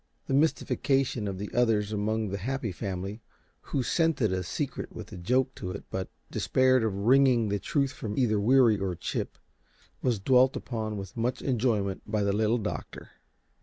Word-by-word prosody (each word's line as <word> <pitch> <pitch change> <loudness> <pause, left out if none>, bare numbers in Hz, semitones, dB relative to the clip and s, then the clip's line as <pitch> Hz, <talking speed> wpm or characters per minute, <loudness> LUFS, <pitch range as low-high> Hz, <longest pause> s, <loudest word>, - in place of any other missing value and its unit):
The - - -2
mystification 135 -5 +1
of 95 -1 -3
the 105 +2 -6
others 110 -4 +2
among 110 +1 -1
the 100 +1 -3
Happy 125 +1 -2
Family, 95 +3 -5 0.4
who 135 - -2
scented 155 - +1
a 95 - -1
secret 85 - -4
with - - -9
a - - -7
joke 125 +9 +1
to 90 - -6
it 95 - -6
but 95 0 -3 0.2
despaired 130 -1 +3
of 110 - +1
wringing 120 +1 +4
the 100 0 0
truth 140 +1 0
from 105 -6 -6
either 110 -5 +2
Weary 115 0 +5
or 95 -2 -2
Chip, - - -4 0.6
was 120 -5 +1
dwelt 130 +5 +4
upon 110 -3 -4
with 95 -1 -7
much 120 +2 -1
enjoyment 110 -7 0
by 105 -1 0
the 100 0 +1
Little 110 +3 +2
Doctor. 105 -2 -6
110 Hz, 170 wpm, -28 LUFS, 100-130 Hz, 0.6 s, Weary